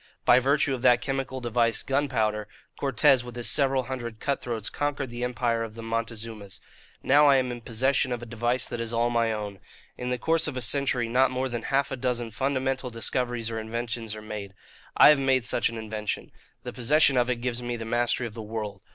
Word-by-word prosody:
By 120 - +7
virtue 135 +1 +2
of 125 - -4
that 120 0 +5
chemical 135 -1 -3
device, 120 -1 +1
gunpowder, 115 -7 0 0.3
Cortes 135 -1 +3
with 120 -1 -9
his 120 -1 -1
several 135 -2 +2
hundred 120 -3 -6
cut 140 -1 -1
throats 115 -4 -3
conquered 145 -3 -2
the 120 +1 -5
empire 120 -1 0
of 110 -1 -7
the 115 - -8
Montezumas. 115 -3 -4 0.4
Now 145 +2 +5
I 140 - +6
am 130 -2 +1
in 120 -1 -6
possession 130 +3 +1
of 120 - -2
a - - -6
device 120 +2 -1
that 120 - -4
is 115 -1 -4
all 120 +1 +1
my 115 -1 +2
own. 105 -2 -5 0.4
In 125 - -3
the 125 - 0
course 160 +5 +1
of 140 -4 -4
a - - 0
century 125 0 +1
not 130 +3 +3
more 130 +1 -2
than 120 -2 -3
half 135 +4 0
a - - -1
dozen 120 -2 -2
fundamental 130 +2 -1
discoveries 120 0 -2
or 110 - -3
inventions 115 0 -4
are 110 - -9
made. 105 -2 -7 0.4
I - - +9
have 150 -2 +6
made 130 -2 +2
such 120 - +1
an 115 - -7
invention. 110 -1 -4 0.3
The - - -6
possession 140 +3 +3
of 125 0 +2
it 125 - +2
gives 120 0 -3
me 120 0 -3
the 115 -1 -6
mastery 120 +2 0
of 115 - -6
the 115 - -7
world. 105 -2 -5
120 Hz, 215 wpm, -26 LUFS, 115-130 Hz, 0.4 s, I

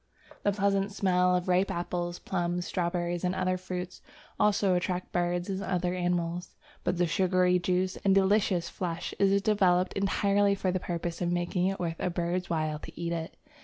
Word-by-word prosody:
The 205 - +2
pleasant 200 0 +1
smell 180 -2 +2
of 180 0 -1
ripe 185 +2 +3
apples, 175 0 -3
plums, 175 -1 -2
strawberries, 175 -1 -1
and 180 0 0
other 185 0 +1
fruits, 180 0 -6 0.4
also 200 -2 +3
attracts 180 0 -1
birds 175 0 0
and 195 -1 -3
other 180 -2 -1
animals. 175 -1 -2 0.3
But 180 0 0
the 175 - +3
sugary 180 +1 +2
juice 185 +1 0
and 195 -1 +2
delicious 195 -2 +3
flesh 175 -2 -4
is 200 0 +4
developed 185 -4 +3
entirely 200 0 +2
for 190 -1 -1
the 185 - -1
purpose 170 -1 -4
of 175 -1 0
making 175 +1 0
it 195 0 -2
worth 165 -2 -3
a 180 - 0
bird's 175 +1 -2
while 155 -2 -1
to - - -11
eat 170 0 -2
it. 165 -1 -5
180 Hz, 175 wpm, -29 LUFS, 175-190 Hz, 0.4 s, is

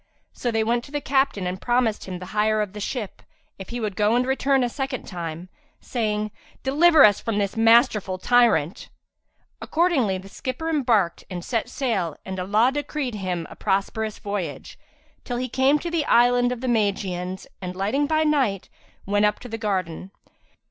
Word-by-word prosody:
So 245 - -3
they 225 -1 +1
went 235 +2 0
to - - -14
the 295 - -1
captain 270 -7 +1
and 180 +1 -4
promised 240 -3 +1
him 185 -1 -5
the 180 - -8
hire 215 +1 +2
of 205 -2 -2
the 210 - -7
ship, 210 0 -4 0.4
if 195 - -8
he 240 - -4
would 210 -4 -3
go 210 +3 +2
and 250 +1 +2
return 270 0 +2
a - - +1
second 265 0 -4
time, 170 -1 -6 0.3
saying, 215 -3 -2 0.3
"Deliver 305 +3 +6
us 205 -2 +4
from 225 -3 -2
this 200 0 -1
masterful 225 -4 +4
tyrant." 225 -7 +2 0.7
Accordingly 300 - +1
the 190 +1 -10
skipper 265 +9 -4
embarked 235 - +1
and 175 -2 -6
set 230 -3 -1
sail 200 - -2
and 190 0 -5
Allah 210 +7 +3
decreed 290 -3 -3
him 185 -5 -3
a - - -12
prosperous 210 +2 -1
voyage, 200 -7 -5 0.5
till 245 - -4
he 255 +1 -2
came 265 +4 +3
to 340 +3 -5
the 335 -3 +1
Island 245 0 +4
of 245 -1 -4
the 260 - -3
Magians 195 -5 -1 0.2
and, 180 -1 -5
landing 215 +10 0
by 315 +1 +2
night, 265 -11 +1 0.4
went 205 +1 +2
up 210 0 +1
to - - -8
the 225 0 -5
garden. 185 -4 -2
220 Hz, 180 wpm, -24 LUFS, 195-255 Hz, 0.7 s, Deliver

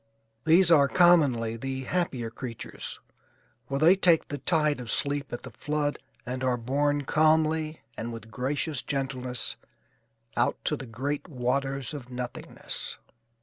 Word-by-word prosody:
These 170 +2 +6
are, 145 -4 +7
commonly, 140 -10 +4
the 130 +2 -4
happier 130 -8 -1
creatures, 115 -1 -7 0.7
for 135 - -1
they 165 +6 +6
take 175 -4 +4
the 145 - -4
tide 150 -2 +2
of 120 -2 -7
sleep 140 +3 0
at 120 - -5
the - - -8
flood 150 -1 -2 0.3
and 130 +1 -4
are 125 -1 +2
borne 145 +4 0
calmly 155 +1 +2
and 115 +1 -4
with 115 -1 -9
gracious 140 +4 -1
gentleness 130 -3 -2 0.8
out - - +2
to - - +1
great 135 +5 -4
waters 135 -1 -1
of 130 -4 -7
nothingness. 125 -1 -5
140 Hz, 135 wpm, -28 LUFS, 125-155 Hz, 0.8 s, are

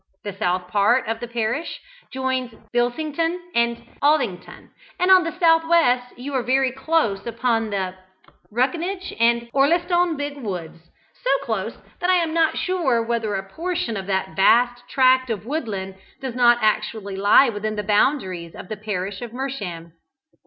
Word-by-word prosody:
The 205 - -5
south 180 -2 -1
part 210 +7 +2
of 225 0 -2
the 240 - -5
parish 235 +6 -2 0.3
joins 260 -2 -2 0.2
Bilsington 310 +8 0
and 235 0 +1 0.2
Aldington, 275 -12 0 0.3
and 360 +2 +3
on 370 -1 +7
the 335 +2 -5
south 325 -2 +5
west 255 -7 +2
you 275 +3 -6
are 260 - +1
very 260 +1 +2
close 265 -7 0
upon 230 -1 0
the 190 -3 -2 0.6
Ruckinge 345 - -1
and 235 0 +3
Orlestone 345 +4 +2
big 285 0 -4
woods 170 - -7 0.3
so - - +1
close - - -3 0.2
that 355 - 0
I 370 - +5
am 335 -3 0
not 325 -1 +2
sure 310 -11 +1
whether 225 -3 -1
a 195 0 -4
portion 335 - -3
of 195 -2 -5
that 190 -4 -2
vast 245 +4 +3
tract 255 -1 +4
of 215 -2 -3
woodland 210 -9 -4 0.2
does 260 -2 -5
not 240 -1 +5
actually 215 -2 0
lie 205 +7 +5
within 215 0 -3
the 210 - -3
boundaries 190 - 0
of - - -10
the 215 - -4
parish 200 -1 -4
of 240 -2 -7
Mersham. 205 -11 -5
240 Hz, 160 wpm, -22 LUFS, 205-290 Hz, 0.6 s, on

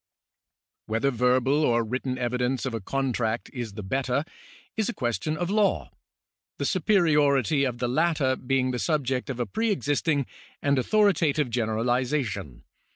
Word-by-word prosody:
Whether 115 +6 +1
verbal 130 +4 +2
or 120 -4 +3
written 125 +3 -3
evidence 125 +1 -1
of 130 - -3
a 115 - -3
contract 120 -1 -2
is 120 -5 -5
the 105 0 -7
better, 130 +7 -1 0.5
is 220 0 0
a 240 - -4
question 135 - -2
of 175 +3 -2
law, 210 -1 +1 0.7
the - - -2
superiority 150 - +3
of 125 -2 -2
the 125 - -1
latter 145 0 +1
being 130 0 0
the 125 - -3
subject 135 -5 -1
of 130 -2 -4
a 120 - 0
pre 225 - -1
existing 145 -6 0 0.3
and 140 -1 +2
authoritative 155 - +2
generalisation. 115 - -1
130 Hz, 145 wpm, -26 LUFS, 120-150 Hz, 0.7 s, or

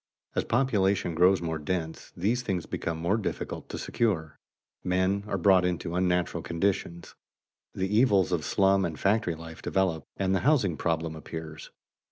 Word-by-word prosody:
As - - -1
population 100 -8 +1
grows 90 +2 +4
more 80 -2 -2
dense, 80 +1 -4
these 110 +8 +1
things 95 -8 -2
become 85 -1 -3
more 85 +6 +1
difficult 110 - -4
to - - -5
secure; 85 -10 -1 0.4
men 95 +2 +1
are 100 - -1
brought 95 0 +5
into 90 -1 -2
unnatural 90 -1 0
conditions, 85 0 -2 0.6
the 95 +2 -1
evils 100 -7 +4
of 85 -4 0
slum 95 +2 +3
and 80 -4 -3
factory 100 -4 +1
life 80 0 -10
develop, 90 -5 0
and 95 -1 +1
the 95 - +2
housing 125 - +2
problem 80 0 -1
appears. 80 0 -8
90 Hz, 155 wpm, -28 LUFS, 85-100 Hz, 0.6 s, brought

